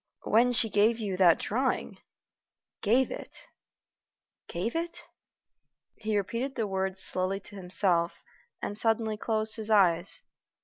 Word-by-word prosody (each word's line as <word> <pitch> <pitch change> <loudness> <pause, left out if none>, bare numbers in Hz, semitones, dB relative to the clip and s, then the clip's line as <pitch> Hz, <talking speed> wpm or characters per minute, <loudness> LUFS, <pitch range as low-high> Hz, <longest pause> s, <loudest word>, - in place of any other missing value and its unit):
"When 240 +3 +3
she 230 -1 +4
gave 215 +3 +2
you 205 -5 -4
that 180 -3 +5
drawing? 255 +5 -2 0.8
Gave 240 +5 +2
it? - - -9 1.0
gave 190 - -4
it?" 335 +1 -4 0.9
He 215 -1 -2
repeated 235 +7 -3
the 225 - -1
words 190 -1 -3
slowly 185 +1 -1
to 205 - -11
himself, 180 -2 +2 0.4
and 205 - -4
suddenly 220 0 0
closed 220 +1 +3
his 220 -1 -5
eyes. 180 -4 +2
210 Hz, 125 wpm, -28 LUFS, 190-225 Hz, 1.0 s, that